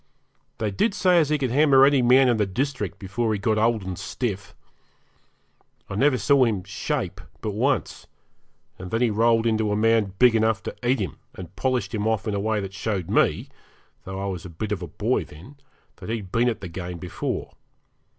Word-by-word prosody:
They 110 -2 -2
did 200 - 0
say 180 -3 +4
as 155 -3 +2
he 150 - +2
could 130 -4 -2
hammer 135 -1 +6
any 140 -1 +4
man 130 +2 +5
in 120 -2 +3
the 105 -2 +1
district 110 - -3
before 110 +4 -2
he - - -1
got 110 +2 0
old 110 -1 +2
and 95 -1 -5
stiff. 100 -5 -4 1.4
I - - -3
never 135 +4 +3
saw 140 0 +4
him 105 -6 0
'shape' 95 -2 -3 0.2
but 110 - -3
once, 130 +7 -1 0.7
and 95 0 -7
then 115 +4 -1
he 120 - +2
rolled 115 +1 +3
into 110 -2 +1
a - - +1
man 110 -2 +2
big 125 0 +6
enough 110 -1 +1
to - - -6
eat 125 +2 +2
him, 95 - -4 0.2
and 90 0 -10
polished 130 -2 -1
him 105 -1 -1
off 110 -1 -1
in 105 - -1
a 100 - -1
way 110 +1 0
that 95 -1 -6
showed 100 -3 -3
me - - +2 0.5
though 95 0 -6
I 100 - -3
was 95 -4 -4
a 90 - -8
bit 100 +6 -5
of 100 -4 -2
a 85 - -5
boy - - -1
then 95 - -14 0.4
that - - -9
he'd 105 -5 -4
been 120 +1 +2
at 110 -2 -4
the 95 - -5
game 90 +1 -6
before. 85 0 -4
110 Hz, 210 wpm, -24 LUFS, 95-125 Hz, 1.4 s, hammer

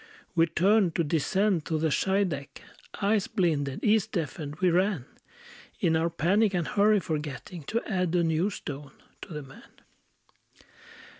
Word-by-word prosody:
We 165 -1 +4
turned 185 +1 +3
to 170 - +2
descend 170 +4 +1
to 160 - -1
the 160 0 0
Scheideck, 185 -6 -1 0.4
Eyes 205 -1 +2
blinded, 155 -10 0
ears 215 -1 +3
deafened, 155 - -4
we 180 +2 +2
ran, 180 -5 +1 0.7
In 170 -6 +2
our 165 +1 +1
panic 190 +5 +2
and 175 -2 0
hurry, 210 +1 +4
forgetting 150 - -5
To 230 +8 -1
add 180 -5 0
a 175 - +3
new 165 +4 +1
stone 145 -7 -7 0.3
to 200 - -10
the 150 -2 -5
man. 135 0 -15
170 Hz, 145 wpm, -28 LUFS, 155-200 Hz, 0.7 s, We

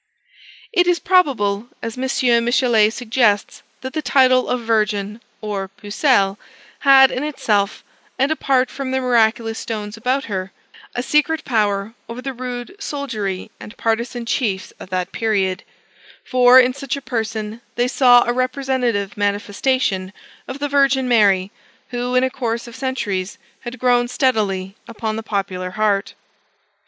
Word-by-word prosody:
It 355 -4 +3
is 355 -1 +3
probable 240 - +1 0.2
(as 230 -1 -4
M. 255 -2 +1
Michelet 235 -3 +3
suggests) 225 -3 0 0.2
that 260 0 -6
the 310 - -2
title 255 -1 +3
of 250 -1 -1
Virgin, 215 -1 -1 0.2
or 205 -3 -3
Pucelle, 205 +1 0 0.4
had 270 -1 +7
in 255 - -3
itself, 210 -9 -1 0.3
and 270 +3 +1
apart 265 -4 +1
from 275 -1 -5
the 265 0 0
miraculous 230 -2 +1
stones 210 -1 -5
about 255 +4 0
her, 190 -4 -4 0.4
a 245 - -2
secret 305 +3 +1
power 210 -3 0 0.2
over 235 +1 -6
the 270 +1 -5
rude 250 +6 -6
soldiery 230 - -4
and 210 - -11
partisan 235 +1 -2
chiefs 215 -6 -2
of - - -10
that 185 -1 -2
period; 200 -4 0 0.6
for, 250 0 +6
in 255 0 +4
such 275 0 -4
a - - -7
person, 220 -2 -4
they 245 +1 +1
saw 250 -2 +5
a 240 - -1
representative 255 -5 -1
manifestation 205 0 -1 0.3
of 260 - -6
the 290 +1 -2
Virgin 275 -2 +2
Mary, 200 -5 +3 0.4
who, 245 0 -2
in 255 - +4
a 260 - 0
course 235 -3 -3
of 235 - -11
centuries, 210 -8 -3 0.2
had 245 0 -8
grown 245 0 +2
steadily 205 -7 0
upon 220 -1 -4
the 220 - -4
popular 190 -4 -3
heart. 205 0 0
235 Hz, 145 wpm, -20 LUFS, 210-260 Hz, 0.6 s, had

